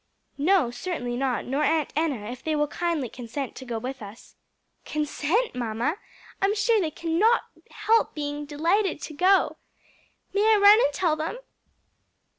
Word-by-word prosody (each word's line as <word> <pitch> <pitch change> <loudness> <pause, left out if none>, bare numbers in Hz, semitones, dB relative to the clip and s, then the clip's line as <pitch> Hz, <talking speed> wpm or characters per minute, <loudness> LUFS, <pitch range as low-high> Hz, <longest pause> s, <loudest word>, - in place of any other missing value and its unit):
"No, 315 -5 +3
certainly 245 -5 -4
not; 255 -1 -1
nor 275 +4 -1
Aunt 315 -1 +1
Enna, 275 -9 -1
if 250 - -9
they 315 -1 0
will 295 0 +2
kindly 325 -3 -2
consent 245 +3 -6
to 260 - -8
go 235 -2 -3
with 260 +3 -6
us." 205 +2 -12 0.5
"Consent, 305 +9 -1
mamma! 240 - -2 0.4
I'm 395 +2 +2
sure 440 0 +2
they 325 - 0
cannot 340 +9 +2 0.3
help 445 +1 +1
being 295 -1 -4
delighted 335 +5 0
to 310 - -6
go. 370 +6 +3 0.8
May 430 +2 +4
I - - +4
run 410 +2 +7
and 285 - +2
tell 325 +1 +1
them?" 315 +9 -4
305 Hz, 155 wpm, -25 LUFS, 265-385 Hz, 0.8 s, run